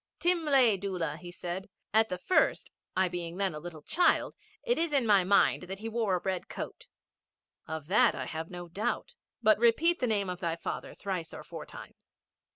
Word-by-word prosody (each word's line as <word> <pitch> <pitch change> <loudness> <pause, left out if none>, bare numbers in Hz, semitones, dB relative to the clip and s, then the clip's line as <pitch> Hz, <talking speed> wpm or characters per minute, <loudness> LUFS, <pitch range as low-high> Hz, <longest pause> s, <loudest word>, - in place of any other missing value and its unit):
'Timlay 295 - +4
Doola,' 175 -6 -3
said 180 +2 -5
he. - - -27 0.2
'At 220 0 +5
the 180 - -2
first, 275 - +1 0.2
I 190 0 +3
being 175 -1 -5
then 195 -3 0
a 150 - -6
little 160 -2 -9
child, 355 - +2 0.3
it 485 -5 +1
is 330 -2 0
in 270 -4 +3
my 205 -4 +5
mind 200 +2 +4
that 195 - -4
he 220 +3 -6
wore 220 -4 +1
a - - 0
red 190 -2 -3
coat.' - - -7 0.8
'Of 160 -2 -5
that 190 +7 +4
I - - -4
have 160 0 -5
no 175 -1 -7
doubt. 205 - -3 0.3
But 215 -1 +5
repeat 315 +10 +4
the 250 - +1
name 205 -3 +1
of 180 -1 -4
thy 170 -2 -1
father 165 - -5
thrice 185 -5 -4
or - - -8
four - - -8
times.' - - -13
195 Hz, 195 wpm, -30 LUFS, 175-230 Hz, 0.8 s, At